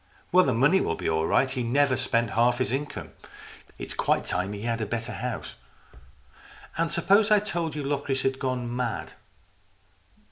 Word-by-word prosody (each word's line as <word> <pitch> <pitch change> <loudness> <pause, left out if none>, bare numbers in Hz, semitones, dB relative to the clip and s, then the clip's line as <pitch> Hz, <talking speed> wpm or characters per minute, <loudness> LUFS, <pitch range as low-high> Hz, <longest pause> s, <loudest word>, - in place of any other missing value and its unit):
Well, 185 +1 +6
the 130 - +2
money 145 +11 +4
will 80 - -1
be - - -4
all 80 0 +1
right. 135 - +3
He's 130 -1 -3
never 135 +3 +2
spent 120 -3 0
half 120 +1 +3
his 130 -2 -1
income. 145 +3 -4 0.7
It's - - -5
quite - - +1
time 90 +2 -1
he 105 +1 -7
had 115 -1 -1
a 110 - -2
better 115 +2 -3
house." 125 -3 -5 0.7
" - - -22
And 165 0 +1
suppose 200 +5 +3
I 210 - +6
told 170 -7 -2
you 150 - -3
that 140 - -3
Locris 140 -2 -1
had 135 0 0
gone 125 -2 -2
mad?" 125 -3 -3
130 Hz, 185 wpm, -26 LUFS, 115-145 Hz, 0.7 s, Well